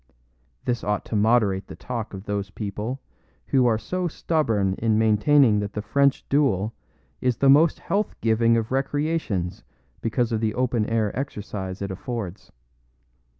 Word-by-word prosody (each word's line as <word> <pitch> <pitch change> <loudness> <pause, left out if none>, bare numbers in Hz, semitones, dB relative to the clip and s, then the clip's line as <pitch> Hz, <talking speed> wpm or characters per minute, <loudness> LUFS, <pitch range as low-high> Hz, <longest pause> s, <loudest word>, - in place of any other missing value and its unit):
This 120 -1 -1
ought 105 -1 -1
to - - -4
moderate 105 -3 +2
the - - -9
talk 115 -5 -5
of 95 - -8
those 100 -1 -2
people 105 +5 -4 0.5
who 130 -2 +3
are 115 -2 +3
so 180 +11 -2
stubborn 115 - 0
in 110 -1 +2
maintaining 110 +2 +4
that 105 0 -4
the 105 - -3
French 140 +3 +2
duel 115 -7 +1 0.5
is 125 -2 +1
the 135 +1 +5
most 155 +4 +5
health 205 +2 -1
giving 115 +1 +3
of 110 0 -2
recreations 135 - -1 0.4
because 120 +1 0
of 110 - 0
the 110 -1 0
open 120 -3 0
air 110 -3 0
exercise 100 -8 -5
it 100 - -4
affords. 105 -1 -6
115 Hz, 150 wpm, -24 LUFS, 105-135 Hz, 0.5 s, the